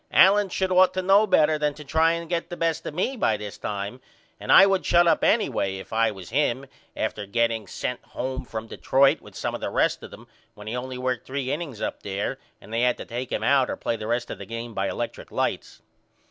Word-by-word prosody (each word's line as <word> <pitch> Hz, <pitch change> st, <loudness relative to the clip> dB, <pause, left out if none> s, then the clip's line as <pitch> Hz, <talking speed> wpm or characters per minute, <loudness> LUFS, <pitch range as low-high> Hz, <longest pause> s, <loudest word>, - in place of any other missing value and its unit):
Allen 200 Hz, +1 st, +6 dB
should 190 Hz, +1 st, -1 dB
ought 185 Hz, 0 st, +5 dB
to 185 Hz, -, 0 dB
know 200 Hz, +3 st, +5 dB
better 155 Hz, -4 st, +3 dB
than 150 Hz, -1 st, 0 dB
to 150 Hz, -, -10 dB
try 160 Hz, +3 st, +2 dB
and 170 Hz, 0 st, -4 dB
get 170 Hz, 0 st, -2 dB
the 175 Hz, -, -6 dB
best 165 Hz, -1 st, 0 dB
of -, -, -5 dB
me 220 Hz, +10 st, 0 dB
by 110 Hz, -, +1 dB
this 105 Hz, -1 st, -8 dB
time 105 Hz, +4 st, -5 dB, 0.4 s
and -, -, -2 dB
I 195 Hz, -, +9 dB
would 195 Hz, -1 st, +1 dB
shut 175 Hz, 0 st, +4 dB
up 170 Hz, -, +3 dB
anyway 95 Hz, 0 st, +1 dB
if 95 Hz, -, -10 dB
I 115 Hz, 0 st, +3 dB
was 95 Hz, -3 st, -9 dB
him 135 Hz, -1 st, +1 dB, 0.3 s
after 105 Hz, -1 st, -3 dB
getting 115 Hz, -1 st, 0 dB
sent 125 Hz, +6 st, -4 dB
home 130 Hz, +1 st, -5 dB
from 110 Hz, -2 st, -6 dB
Detroit 135 Hz, +4 st, +2 dB
with -, -, -15 dB
some -, -, -3 dB
of -, -, -5 dB
the -, -, -2 dB
rest -, -, +1 dB
of -, -, -9 dB
them -, -, -13 dB, 0.3 s
when 105 Hz, -1 st, -12 dB
he 110 Hz, +3 st, -4 dB
only 125 Hz, +1 st, -5 dB
worked 125 Hz, -1 st, -2 dB
3 135 Hz, -1 st, -3 dB
innings 145 Hz, -8 st, -5 dB
up -, -, -3 dB
there 100 Hz, +6 st, -3 dB, 0.2 s
and 110 Hz, -, -13 dB
they 115 Hz, -, +1 dB
had 125 Hz, 0 st, +2 dB
to -, -, -8 dB
take 125 Hz, +2 st, -5 dB
him -, -, -2 dB
out 135 Hz, -2 st, +3 dB
or -, -, -3 dB
play 115 Hz, -, -2 dB
the 110 Hz, -1 st, -6 dB
rest 120 Hz, +1 st, -1 dB
of -, -, -7 dB
the -, -, -7 dB
game 115 Hz, 0 st, -6 dB
by 95 Hz, -1 st, -1 dB
electrick 120 Hz, -, -5 dB
lights. -, -, -3 dB
130 Hz, 245 wpm, -25 LUFS, 115-165 Hz, 0.4 s, I